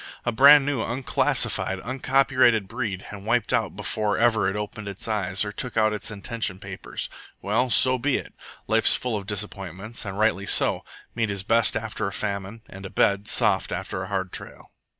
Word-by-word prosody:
A 120 - +1
brand 140 +4 +7
new, 140 -4 -1
unclassified, 120 -5 0
uncopyrighted 130 -3 +2
breed, 110 -4 -4
and 100 -2 -9
wiped 115 +2 0
out 115 -6 0
before 105 +1 -2
ever 110 -4 +2
it 95 - -4
opened 105 0 -6
its 100 +2 -6
eyes 95 -3 0
or 105 - -4
took 120 +3 -4
out 110 -1 +3
its 105 - -4
intention 105 -1 -3
papers! - - -5 0.3
Well, 115 +6 0
so 130 +1 +5
be 140 +2 +1
it. - - -9 0.3
Life's - - +5
full 125 -3 -3
of 100 -2 -5
disappointments, 100 +1 -4
and 100 -3 -6
rightly 100 -2 +1
so. - - +4 0.3
Meat 115 -2 -1
is 100 -2 -3
best 115 +3 +2
after 110 -2 -4
a - - -4
famine, 100 +2 -5
and 95 +1 -11
a 95 - -7
bed 100 +1 +1
soft - - +1
after 95 - -4
a 95 - -5
hard 95 -2 -3
trail. - - -8
105 Hz, 185 wpm, -24 LUFS, 100-120 Hz, 0.3 s, brand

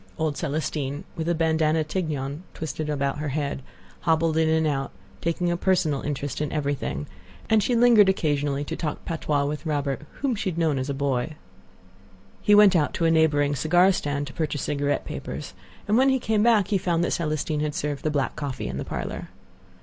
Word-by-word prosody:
Old 155 -2 0
Celestine, 150 -1 -2
with 165 -1 -2
a 170 - +2
bandana 160 -1 +2
tignon 150 -3 -3
twisted 155 0 -4
about 140 -1 -1
her 150 - -2
head, 140 -1 -2 0.4
hobbled 160 -1 +2
in 160 0 +3
and 160 0 +2
out, 135 -2 -1 0.3
taking 175 +1 0
a - - +1
personal 170 -7 +1
interest 145 0 -3
in 150 - -2
everything; 135 - -2 0.5
and 220 -1 +5
she 245 +4 +1
lingered 230 -4 +6
occasionally 145 -5 0
to - - -4
talk 150 -3 -4
patois 150 -3 0
with 150 +1 -3
Robert, 145 -4 -1 0.2
whom 275 -3 +1
she 205 -3 -2
had 170 - -5
known 160 -5 +1
as 130 +2 -3
a 140 - -1
boy. 140 +1 -1 1.1
He 205 - +5
went 205 -2 +7
out 150 -4 +2
to 165 - 0
a 165 - +4
neighboring 145 -3 +3
cigar 175 +7 +4
stand 145 -5 -2
to 145 - -9
purchase 155 -3 -2
cigarette 145 0 -1
papers, - - -6 0.3
and 215 +4 +3
when 265 +1 +5
he 265 - +3
came 220 -4 0
back 220 -4 +4
he 200 - +2
found 170 -2 +1
that - - 0
Celestine 155 -1 -1
had 150 -1 -2
served 145 -1 -2
the 155 - +1
black 145 -3 -1
coffee 145 -3 -4
in - - -4
the - - -3
parlor. - - -5
155 Hz, 195 wpm, -25 LUFS, 145-170 Hz, 1.1 s, went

